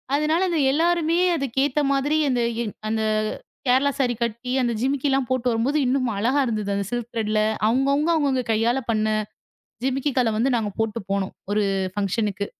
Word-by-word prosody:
அதனால 305 +4 +1
அத 340 - 0
எல்லாருமே 335 +2 +2 0.2
அதுக்கு 270 -3 -4
ஏத்த 290 +1 0
மாதிரி 285 +3 +1
அந்த 250 -2 +1 0.5
அந்த 220 0 0 0.7
கேரளா 265 +3 +3
சாரீ 250 -3 +2
கட்டி 235 +2 -4
அந்த 240 -1 0
ஜிமிக்கிலாம் 270 0 +1
போட்டு 255 -1 0
வரும்போது, 235 +6 0
இன்னும் 255 -1 +1
அழகா 250 +8 +2
இருந்தது 210 -3 -2
அந்த 200 0 -1
சில்க் 240 -1 -3
திரேட்ல 215 -2 0 0.3
அவங்க 260 +5 +2
அவங்க 305 +4 +1
அவங்க 275 -4 +1
கையால 230 +4 +1
பண்ண 215 -1 +1 0.7
ஜிமிக்கி 270 +2 0
கல்ல 235 -3 +2
வந்து 255 +4 +2
நாங்க 215 -3 -1
போட்டுப் 220 -3 -2
போனோம். 195 -1 -1 0.2
ஒரு 210 0 +2 0.3
ஃபங்சன்க்கு. 205 0 -1
250 Hz, 160 wpm, -23 LUFS, 220-275 Hz, 0.7 s, கேரளா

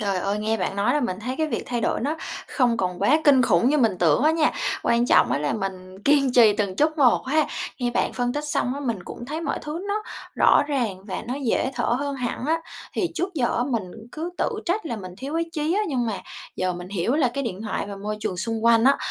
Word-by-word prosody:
Trời 200 -2 0
ơi! 200 +3 -1
Nghe 220 +1 0
bạn 195 -1 -2
nói 200 +1 +2
là 295 - +2
mình 190 -6 -2
thấy 250 +4 -3
cái 315 - +1
việc 305 - -2
thay 240 -1 -2
đổi - - 0
nó 290 +6 -1 0.3
không 245 -4 +2
còn 180 -4 -2
quá 295 +10 +4
kinh 275 -3 +6
khủng 210 0 +3
như 300 +2 +3
mình 220 -8 +2
tưởng 165 - +3
á 305 - +5
nha, 320 -1 +2 0.3
quan 235 +1 +2
trọng - - +4
á - - +1
là 145 0 -1
mình 190 -1 -5
kiên 275 -1 +3
trì 230 -4 +7
từng 200 -3 -1
chút 310 +4 +1
một 260 -2 +4
ha. 305 +3 +2 0.3
Nghe 245 -2 0
bạn - - 0
phân 245 -1 -1
tích 295 +2 -3
xong 275 -4 0
á, 285 - -5
mình 230 -9 -2
cũng 240 - -8
thấy 305 +4 -4
mọi 335 - -2
thứ 315 +5 -5
nó 420 +1 -1 0.3
rõ - - +5
ràng 230 -10 -2
và 200 - -5
nó 250 - -1
dễ 255 +1 +1
thở 240 - -1
hơn 280 +4 0
hẳn 250 -2 -3
á. 325 +2 +2 0.3
Thì 350 - -1
trước 360 +2 -2
giờ 250 -6 0
á 240 - +1
mình 240 -5 -1 0.3
cứ 325 +3 -4
tự - - +2 0.2
trách 365 +2 0
là 235 - -3
mình 185 -3 -8
thiếu 275 +4 -5
ý 335 - +1
chí 310 0 -1
á, 415 - +2
nhưng 250 -5 0
mà 215 -3 -3 0.4
giờ 185 0 0
mình 175 +1 -7
hiểu 200 +5 0
là 290 -4 +3
cái 275 - -1
điện 205 -3 -4
thoại 210 -2 -3
và 200 -1 -7
môi 210 +2 -4
trường 185 - -2
xung 225 +4 -2
quanh 230 0 +5
á, 275 +1 +6
245 Hz, 265 wpm, -24 LUFS, 205-290 Hz, 0.4 s, trì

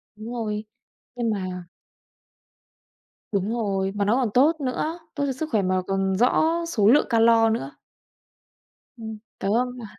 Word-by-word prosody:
Đúng 220 +3 -8
rồi, 215 -2 -3 0.5
nhưng 235 -2 -1
mà 185 -4 -3 1.7
Đúng 200 +2 -1
rồi, 195 -4 -1
mà 200 -1 0
nó 215 +4 +3
còn 255 -4 +1
tốt 305 +5 +4
nữa, 305 +6 -2 0.2
tốt 285 - 0
cho 275 - -1
sức 310 +4 -4
khỏe 215 - +2
mà 185 0 +1
còn 195 0 0
rõ 245 +6 +3 0.2
số 210 -11 +2
lượng 285 +6 +6
calo 225 -1 +5
nữa. 140 -11 -2 1.3
Ừm, 220 -1 -7 0.2
có 195 - -2
hôm 250 +3 0
mà 235 - -8
225 Hz, 155 wpm, -24 LUFS, 200-250 Hz, 1.7 s, lượng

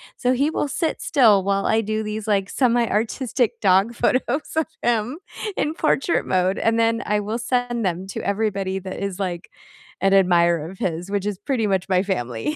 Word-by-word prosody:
so 250 - 0
he 275 +4 +2
will 295 -2 -2
sit 320 +3 -2
still 220 -9 +4
while 195 0 0
I 220 0 +2
do 215 0 -2
these, 215 0 -4
like, 200 -2 +1
semi-artistic 240 0 0
dog 195 +3 +3
photos 255 +4 0
of 320 -1 +1
him 240 +3 0 0.4
in 300 - 0
portrait 320 0 +1
mode, 185 +1 +1
and 225 0 +1
then 230 0 +1
I 210 0 +1
will 210 +2 -3
send 240 -1 -1
them 185 +1 -2
to 195 - -5
everybody 200 -2 -1
that 185 0 -7
is, 200 -1 -4
like, 180 -2 -4 0.5
an 195 0 +3
admirer 170 -4 +3
of 190 - -12
his, 175 +2 -3
which 200 -1 -1
is 205 -2 -2
pretty 225 +1 -1
much 190 -1 -1
my 185 -1 +3
family, 125 - -2
210 Hz, 185 wpm, -22 LUFS, 190-240 Hz, 0.5 s, still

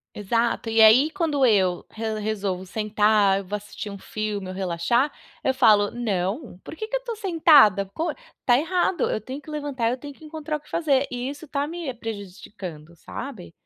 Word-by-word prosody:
Exato. 230 +3 0
E 225 0 +1
aí, 225 +8 +7
quando 315 -6 0
eu 190 -7 +3
re 220 -1 -4
resolvo 200 -3 -2
sentar, 210 -1 +2
eu 200 - -8
vou 205 +3 -3
assistir 210 +1 -8
um 200 - -7
filme, 210 -1 -4
ou 185 - -5
relaxar, 190 - +1 0.3
eu 265 - +1
falo: 205 -5 +5
"Não, 210 - -3
por - - -9
que 435 +6 -5
que - - -2
eu - - -12
tô 470 -2 -4
sentada? 315 - +5
Pô, 320 - -3 0.3
tá 245 - +5
errado. 355 +2 +1
Eu - - -1
tenho 260 +6 -7
que 310 - -14
levantar, 285 -6 -2
eu 250 - -1
tenho 285 +2 -9
que 315 - -19
encontrar 310 0 -4
o - - -16
que - - -22
fazer." 285 -5 +1
E 245 +1 -4
isso 290 +3 -9
tá 285 0 -1
me 330 -3 -4
prejudicando, 195 -7 -8
sabe? 185 - -8
230 Hz, 195 wpm, -24 LUFS, 200-290 Hz, 0.3 s, aí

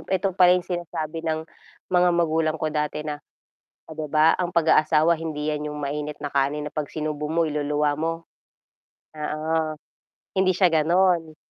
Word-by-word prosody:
yung - - -16
eto 190 0 0
pala 180 0 +6
yung 180 - -3
sinasabi 165 -2 -4
ng 160 0 -1 0.5
mga 180 0 +5
magulang 160 -2 +1
ko 155 - 0
dati 150 0 -2
na, 150 -1 -4 0.7
oh,' 155 - -7
di 155 - -2
ba 155 +1 +5
ang 180 -1 -1
pag-aasawa 160 0 +4
hindi 155 -2 -3
'yan 150 0 -3
yung 150 - -6
mainit 150 +1 -4
na 145 - -3
kanin 140 +2 0
na - - -45
pag 150 -1 -2
sinubo 150 -1 -3
mo 165 +1 +2
iluluwa 150 0 0
mo. 165 +1 0 1.0
Oo, 155 +1 -2 0.6
hindi 185 0 +3
siya 180 -1 +4
gano'n. 165 0 +2
155 Hz, 165 wpm, -24 LUFS, 150-170 Hz, 1.0 s, pala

